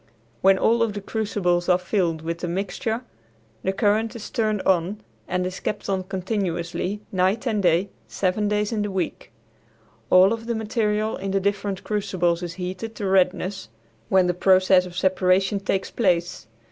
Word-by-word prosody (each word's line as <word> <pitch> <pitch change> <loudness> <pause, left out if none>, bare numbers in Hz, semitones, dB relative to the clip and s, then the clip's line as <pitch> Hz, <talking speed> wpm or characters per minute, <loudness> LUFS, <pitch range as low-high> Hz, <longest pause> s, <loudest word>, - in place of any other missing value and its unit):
When 190 0 +5
all 230 +4 +3
of 225 -2 +1
the 205 - -4
crucibles 195 -4 -1
are 180 - +5
filled 175 -3 -1
with 170 +1 -3
the 175 - -3
mixture 200 +6 -2 0.6
the 190 - 0
current 215 +2 +1
is 225 - -8
turned 215 -4 0
on 190 +3 +1 0.3
and 180 0 -1
is 185 0 -4
kept 210 - -4
on 190 -1 0
continuously 185 0 -3
night 190 +6 +1
and 220 -4 0
day 175 +2 +2 0.2
seven 200 +2 0
days 210 +1 0
in 220 -2 -1
the 205 - -1
week. 190 -3 -4 0.8
All 185 +3 +6
of 230 0 -6
the 235 - -1
material 215 -1 -1
in 195 - -4
the 195 +1 +1
different 200 0 -2
crucibles 180 -5 0
is 170 -1 -5
heated 185 +5 -5
to 205 - -4
redness, 185 - +1 0.4
when 190 -1 +4
the 180 - +1
process 185 0 +4
of 175 -1 -10
separation 190 +1 +2
takes 195 -1 -2
place. 175 - 0
190 Hz, 170 wpm, -24 LUFS, 180-210 Hz, 0.8 s, All